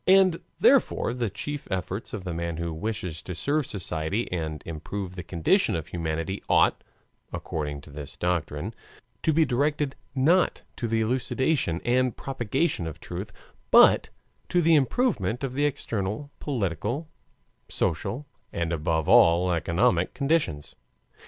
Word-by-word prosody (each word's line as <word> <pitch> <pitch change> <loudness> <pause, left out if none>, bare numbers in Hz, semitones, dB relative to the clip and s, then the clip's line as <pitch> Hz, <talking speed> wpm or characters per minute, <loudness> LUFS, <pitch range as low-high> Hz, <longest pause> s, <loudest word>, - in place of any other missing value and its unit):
And 185 -2 +5 0.2
therefore - - +4
the 120 -3 -1
chief 145 +9 -5
efforts 95 +3 -3
of 105 -4 -5
the 90 -2 -4
man 85 -1 -3
who 85 -1 -3
wishes 90 -3 -4
to 90 - -6
serve 145 - 0
society 90 +2 -2
and 80 -4 -3
improve 90 +4 -5
the 90 - -5
condition 85 -3 +2
of 80 -2 -4
humanity 80 +3 -3
ought, - - +4 0.5
according 75 -2 -4
to 75 - -14
this 75 -1 -8
doctrine, 90 +2 -1 0.5
to 160 - +2
be 160 +1 +4
directed 140 +2 0 0.2
not 165 +8 +3
to 120 - -2
the 115 0 +1
elucidation 125 - 0
and 125 0 +2
propagation 130 - -1
of 80 - -7
truth, - - -6 0.4
but - - +7 0.4
to 175 - +3
the 165 -1 +4
improvement 135 - +1
of 130 -2 -2
the 145 +2 +1
external 115 -2 -2
political, 115 - -2 0.6
social, 140 +5 -1 0.3
and 85 0 -1
above 80 0 0
all 85 +2 +6
economic 85 +2 +1
conditions. 140 - 0
100 Hz, 140 wpm, -26 LUFS, 85-135 Hz, 0.6 s, but